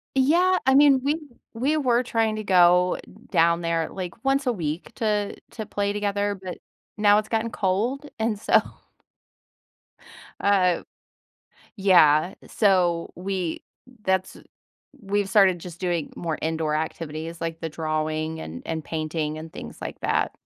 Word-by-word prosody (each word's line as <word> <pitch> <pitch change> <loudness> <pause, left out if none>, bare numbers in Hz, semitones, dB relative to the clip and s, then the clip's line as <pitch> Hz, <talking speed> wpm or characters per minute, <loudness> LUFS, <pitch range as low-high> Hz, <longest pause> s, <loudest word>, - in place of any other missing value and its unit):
Yeah. 345 +8 +4
I 265 - +5
mean, 280 -1 +6
we 290 +3 +1 0.4
we 270 +7 +1
were 250 -5 +2
trying 225 -3 0
to 215 - -5
go 180 -1 +4 0.3
down 170 +1 +3
there, 165 -1 0
like, 185 +6 -7
once 270 0 +1
a 245 - +3
week 165 -5 -4
to 210 -3 -1 0.2
to 220 -3 -6
play 200 0 -1
together, 205 0 -1
but 185 -2 -7 0.4
now 210 0 +5
it's 215 - -2
gotten 225 0 -1
cold, 230 +10 -1
and 220 -2 0
so - - +4 1.8
uh, 185 -3 +3 0.9
yeah, 175 -4 +5
so 180 -5 +2
we 185 -2 -3 0.4
that's 190 0 0 0.6
we've 205 -1 -1
started 195 -4 +4
just 175 +1 -10
doing 175 -4 -2
more 165 -2 -3
indoor 160 -1 -1
activities 160 +1 -4
like 165 0 -4
the 165 - -3
drawing 155 0 -2
and 80 - -7
and 160 -1 -3
painting 155 -1 -3
and 160 0 -9
things - - -9
like - - -6
that. - - 0
185 Hz, 140 wpm, -24 LUFS, 165-215 Hz, 1.8 s, mean